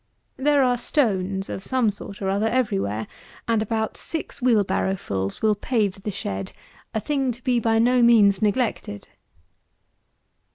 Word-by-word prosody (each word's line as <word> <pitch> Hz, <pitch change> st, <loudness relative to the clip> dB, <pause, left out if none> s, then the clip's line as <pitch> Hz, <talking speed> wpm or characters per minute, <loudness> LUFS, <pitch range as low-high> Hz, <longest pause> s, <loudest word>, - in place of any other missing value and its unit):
There 285 Hz, +1 st, +3 dB
are 245 Hz, -1 st, +2 dB
stones, 195 Hz, -8 st, 0 dB
of 190 Hz, -, -6 dB
some 250 Hz, -3 st, +1 dB
sort 200 Hz, 0 st, -9 dB
or 190 Hz, -, 0 dB
other, 205 Hz, +3 st, +1 dB
every 225 Hz, -4 st, +1 dB
where, 105 Hz, -, -3 dB, 0.4 s
and 225 Hz, -2 st, +2 dB
about 220 Hz, 0 st, -2 dB
six 320 Hz, -3 st, -4 dB
wheel 235 Hz, -4 st, +4 dB
barrow 190 Hz, 0 st, 0 dB
fulls 95 Hz, -, -4 dB
will 215 Hz, -1 st, +4 dB
pave 205 Hz, -3 st, -1 dB
the 210 Hz, -, -4 dB
shed, 100 Hz, -, -5 dB, 0.4 s
a 220 Hz, -, -1 dB
thing 270 Hz, +1 st, -1 dB
to 240 Hz, +1 st, -11 dB
be 245 Hz, -2 st, +2 dB
by 225 Hz, 0 st, +2 dB
no 245 Hz, +2 st, +4 dB
means 210 Hz, -5 st, +5 dB
neglected. 210 Hz, -, -1 dB
220 Hz, 160 wpm, -23 LUFS, 195-245 Hz, 0.4 s, means